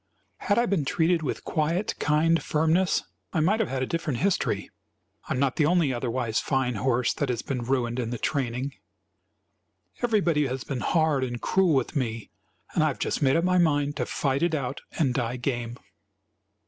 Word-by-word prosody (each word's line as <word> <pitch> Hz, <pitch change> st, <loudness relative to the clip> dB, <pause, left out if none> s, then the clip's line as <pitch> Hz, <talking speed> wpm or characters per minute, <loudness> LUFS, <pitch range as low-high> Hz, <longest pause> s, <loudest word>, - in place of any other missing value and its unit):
"Had 205 Hz, -, 0 dB
I 240 Hz, -, +4 dB
been 195 Hz, -9 st, +1 dB
treated 165 Hz, +4 st, +1 dB
with 150 Hz, -, -3 dB
quiet, 165 Hz, +6 st, 0 dB
kind 160 Hz, +2 st, +3 dB
firmness, 160 Hz, +4 st, +2 dB, 0.3 s
I -, -, +1 dB
might 190 Hz, +8 st, +2 dB
have 225 Hz, -, 0 dB
had 130 Hz, -1 st, -1 dB
a -, -, +1 dB
different 155 Hz, -3 st, -2 dB
history. 195 Hz, +7 st, 0 dB, 0.6 s
I -, -, +1 dB
am -, -, -2 dB
not 135 Hz, -2 st, +1 dB
the 150 Hz, -, +3 dB
only 165 Hz, -5 st, +3 dB
otherwise 120 Hz, -2 st, -1 dB
fine 130 Hz, -3 st, 0 dB
horse 120 Hz, +2 st, +1 dB
that 145 Hz, -, -2 dB
has 120 Hz, -2 st, -2 dB
been 130 Hz, -3 st, -3 dB
ruined 120 Hz, -1 st, -1 dB
in 115 Hz, -2 st, -2 dB
the 120 Hz, -, -3 dB
training. 130 Hz, +1 st, -2 dB, 1.3 s
Everybody 180 Hz, -, +2 dB
has 130 Hz, 0 st, -4 dB
been 135 Hz, -3 st, -4 dB
hard 155 Hz, -2 st, +2 dB
and 120 Hz, -2 st, -3 dB
cruel 185 Hz, 0 st, +2 dB
with 130 Hz, +2 st, 0 dB
me, 115 Hz, -5 st, -2 dB, 0.4 s
and -, -, +2 dB
I -, -, +4 dB
have -, -, -2 dB
just -, -, -2 dB
made 135 Hz, -2 st, +4 dB
up 165 Hz, -, +2 dB
my 180 Hz, 0 st, +3 dB
mind 145 Hz, -3 st, +2 dB
to -, -, -1 dB
fight 135 Hz, 0 st, 0 dB
it 170 Hz, -1 st, +2 dB
out 135 Hz, -2 st, -3 dB, 0.2 s
and 135 Hz, -6 st, +2 dB
die 120 Hz, -1 st, -1 dB
game. 120 Hz, -2 st, -3 dB
140 Hz, 190 wpm, -26 LUFS, 125-165 Hz, 1.3 s, I